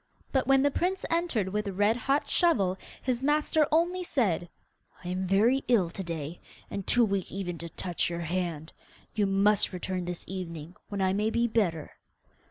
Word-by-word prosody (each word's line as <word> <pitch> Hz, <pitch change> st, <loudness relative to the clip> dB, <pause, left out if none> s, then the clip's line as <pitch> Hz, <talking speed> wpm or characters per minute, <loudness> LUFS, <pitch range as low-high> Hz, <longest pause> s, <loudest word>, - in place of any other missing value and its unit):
But 265 Hz, -3 st, +1 dB
when 270 Hz, 0 st, +5 dB
the 285 Hz, -, +3 dB
prince 370 Hz, +6 st, -1 dB
entered 330 Hz, -, +1 dB
with 210 Hz, +2 st, -2 dB
the 200 Hz, -, -3 dB
red 205 Hz, +4 st, +3 dB
hot 275 Hz, +4 st, 0 dB
shovel 205 Hz, -, +2 dB, 0.3 s
his 250 Hz, -1 st, 0 dB
master 300 Hz, +1 st, +2 dB
only 350 Hz, +3 st, +2 dB
said, 195 Hz, -, 0 dB, 0.6 s
'I -, -, -4 dB
am 185 Hz, +1 st, -2 dB
very 225 Hz, +8 st, +3 dB
ill 205 Hz, -9 st, +3 dB
to 190 Hz, -, -4 dB
day, 165 Hz, -1 st, -5 dB, 0.3 s
and 200 Hz, -, -5 dB
too 245 Hz, -1 st, +5 dB
weak 195 Hz, -3 st, -2 dB
even 180 Hz, -3 st, -4 dB
to 170 Hz, -, -6 dB
touch 175 Hz, +1 st, -2 dB
your 170 Hz, 0 st, -4 dB
hand. 170 Hz, -2 st, -3 dB, 0.4 s
You 205 Hz, -2 st, +1 dB
must 200 Hz, +2 st, +3 dB
return 185 Hz, 0 st, -3 dB
this 175 Hz, -1 st, -5 dB
evening, 170 Hz, -3 st, -6 dB
when 200 Hz, -1 st, -3 dB
I 190 Hz, 0 st, +2 dB
may 210 Hz, +2 st, +1 dB
be 235 Hz, +1 st, +1 dB
better. 185 Hz, -9 st, 0 dB
200 Hz, 180 wpm, -29 LUFS, 180-250 Hz, 0.6 s, when